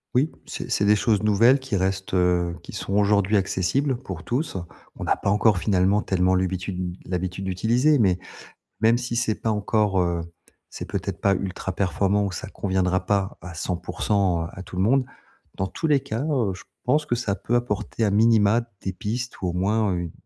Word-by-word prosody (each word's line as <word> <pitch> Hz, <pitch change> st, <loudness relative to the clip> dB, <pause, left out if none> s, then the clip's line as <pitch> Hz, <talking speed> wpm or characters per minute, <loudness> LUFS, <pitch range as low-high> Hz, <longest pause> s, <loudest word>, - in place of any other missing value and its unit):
Oui, 140 Hz, +6 st, +3 dB, 0.2 s
c'est -, -, -6 dB
c'est -, -, +1 dB
des 105 Hz, +1 st, +5 dB
choses 105 Hz, 0 st, +1 dB
nouvelles 115 Hz, +6 st, +5 dB
qui 130 Hz, -6 st, -2 dB
restent, 95 Hz, +1 st, -2 dB
heu, 90 Hz, -1 st, +2 dB
qui -, -, -10 dB
sont 95 Hz, -, -4 dB
aujourd'hui 100 Hz, 0 st, +3 dB
accessibles 120 Hz, +9 st, 0 dB
pour 95 Hz, -8 st, -8 dB
tous. 125 Hz, -4 st, -2 dB, 0.4 s
On -, -, -5 dB
n'a -, -, +2 dB
pas -, -, -2 dB
encore 105 Hz, -1 st, +4 dB
finalement 95 Hz, +1 st, +2 dB
tellement 95 Hz, -1 st, +2 dB
l'habitude- 90 Hz, -1 st, -2 dB
l'habitude 95 Hz, +1 st, -3 dB
d'utiliser 120 Hz, +11 st, +2 dB
mais 95 Hz, -5 st, +3 dB, 0.6 s
même 115 Hz, +2 st, +4 dB
si 120 Hz, -1 st, -3 dB
c'est 115 Hz, -3 st, +1 dB
pas 110 Hz, -, -1 dB
encore, 105 Hz, -2 st, +1 dB
heu, 85 Hz, -1 st, 0 dB, 0.5 s
c'est -, -, -7 dB
peut-être -, -, -3 dB
pas 100 Hz, -, +3 dB
ultra-performant 95 Hz, +2 st, -1 dB
ou 100 Hz, -, -2 dB
ça -, -, -6 dB
conviendra 95 Hz, -1 st, 0 dB
pas 100 Hz, -1 st, 0 dB
à 90 Hz, 0 st, -8 dB
100%, 90 Hz, +1 st, -1 dB
heu, -, -, -5 dB
à 95 Hz, -, -8 dB
tout 90 Hz, 0 st, -9 dB
le 95 Hz, -, +1 dB
monde, 130 Hz, +5 st, +3 dB, 0.5 s
dans 95 Hz, -, -1 dB
tous 160 Hz, -, -3 dB
les 145 Hz, -2 st, +4 dB
cas, 115 Hz, +2 st, -4 dB
heu, 130 Hz, -11 st, 0 dB
je -, -, -12 dB, 0.2 s
pense 150 Hz, +4 st, +2 dB
que 120 Hz, -, 0 dB
ça 105 Hz, -5 st, -1 dB
peut 120 Hz, -, -2 dB
apporter 115 Hz, -1 st, -1 dB
à -, -, +2 dB
minima 110 Hz, +1 st, +4 dB, 0.2 s
des 95 Hz, -, -3 dB
pistes 115 Hz, +5 st, -4 dB
ou 95 Hz, -, -1 dB
au -, -, -3 dB
moins 100 Hz, +2 st, +1 dB
une 85 Hz, -2 st, -3 dB
100 Hz, 195 wpm, -24 LUFS, 95-115 Hz, 0.6 s, des